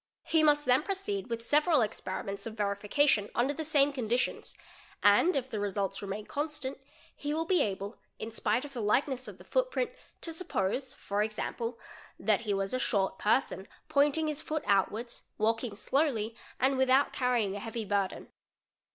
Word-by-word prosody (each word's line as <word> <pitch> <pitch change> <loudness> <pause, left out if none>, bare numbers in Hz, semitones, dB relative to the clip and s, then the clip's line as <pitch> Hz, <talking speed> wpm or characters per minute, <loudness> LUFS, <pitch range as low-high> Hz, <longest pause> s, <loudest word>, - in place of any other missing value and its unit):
He 320 - +3
must 295 -1 +4
then 255 +2 +5
proceed 390 - -2
with 230 0 -3
several 300 0 +4
experiment: 200 -2 -4
of 220 - -7
verification 205 +3 +2
under 255 +4 +2
the 315 - -4
same 290 -2 +3
conditions, 245 -1 -1 0.5
and 205 - +5
if 265 -2 0
the 225 -5 -4
results 200 -1 -2
remain 200 +1 -5
con 295 +2 -2
stant, 280 -3 -4 0.4
he 295 +1 -3
will 325 +1 0
be 360 +1 +3
able, 200 +2 -3 0.2
in 225 - -6
spite 225 +4 0
of 285 - -10
the 240 - -3
likeness 255 +4 +1
of - - -9
the - - -14
footprint, - - 0 0.3
to 330 - -4
suppose 265 - -1
for 200 +1 -2
example 230 +2 -2 0.4
that 210 0 +2
he 215 -3 -1
was 195 +2 -1
"a 255 - +1
short 195 -6 0
person, 210 -3 +1 0.2
pointing 295 +2 +3
his 305 -1 -1
foot 310 0 -3
outwards 215 +4 0 0.2
walking 225 0 0
slowly, 230 -3 0 0.2
and 265 +1 +3
without 265 +1 +4
carrying 240 -6 +1
a - - -4
heavy 225 +1 -4
burden'. 200 -1 -1
245 Hz, 170 wpm, -31 LUFS, 210-290 Hz, 0.5 s, then